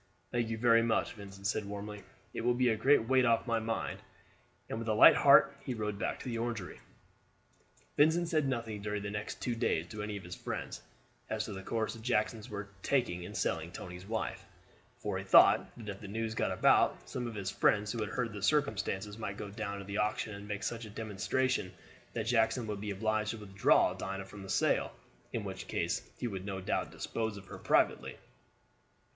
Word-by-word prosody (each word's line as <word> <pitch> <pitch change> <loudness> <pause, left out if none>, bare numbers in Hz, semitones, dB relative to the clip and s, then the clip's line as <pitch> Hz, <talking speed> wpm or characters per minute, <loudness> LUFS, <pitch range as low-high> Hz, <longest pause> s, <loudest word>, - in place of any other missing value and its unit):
"Thank 120 -2 0
you 115 - -2
very 115 0 +5
much," 115 -1 +1
Vincent 100 -2 -11
said 105 +1 +1
warmly; 105 +1 -6 0.3
"it - - -3
will 120 +1 +2
be 125 0 +3
a 110 - +3
great 115 +1 +4
weight 130 0 +4
off 115 -2 +3
my 115 -2 +1
mind," 110 0 -3 0.7
and 110 - -4
with 115 - -5
a 110 - +2
light - - +10
heart - - +6
he 125 - -3
rode 105 -2 -3
back - - -2
to - - -9
the 115 -2 -2
Orangery. 115 -5 -4 1.2
Vincent 160 +3 +4
said 155 -4 +1
nothing 115 -5 -3
during 105 0 -3
the 100 - -3
next 105 +1 -5
two 125 - 0
days 115 -8 0
to 105 -1 -6
any 105 0 -3
of 95 - -9
his 90 - -8
friends - - -5 0.5
as 110 -1 -1
to 105 - -6
the 95 - -6
course 110 +3 -2
the 115 - -10
Jacksons 110 -2 0
were 100 -1 -5
taking 120 -10 +1
in 90 - -8
selling 80 +1 -1
Tony's 90 +1 -8
wife; 110 0 -3 0.5
for 100 -2 -3
he - - -5
thought 95 - +6
that 115 -3 -9
if 100 +1 -6
the 100 - -7
news 110 +2 -2
got - - 0
about, - - +3
some 125 -1 -3
of 115 - -6
his 100 -2 -3
friends 105 0 +2
who 120 - -4
had 105 -2 -2
heard 120 0 -2
the 100 - -6
circumstances 105 -6 0
might 100 -2 -4
go 105 - -6
down 100 -1 -4
to 100 - -7
the 100 +1 -3
auction 105 +1 0
and 100 +1 -8
make 105 0 -4
such 115 0 -3
a - - -9
demonstration 110 +1 -1 0.4
that 110 - -2
Jackson 115 +1 +2
would 105 -2 -4
be 105 - -4
obliged 110 +2 0
to 115 - -3
withdraw 100 -2 +3
Dinah 95 0 -5
from 100 +1 -11
the 95 - -9
sale, - - +2 0.4
in - - -2
which - - -6
case - - -2
he 125 - -2
would 95 -4 -5
no 95 -1 -4
doubt 95 - -1
dispose 110 -2 -3
of 100 - -10
her - - -9
privately. - - +2
105 Hz, 210 wpm, -32 LUFS, 100-115 Hz, 1.2 s, light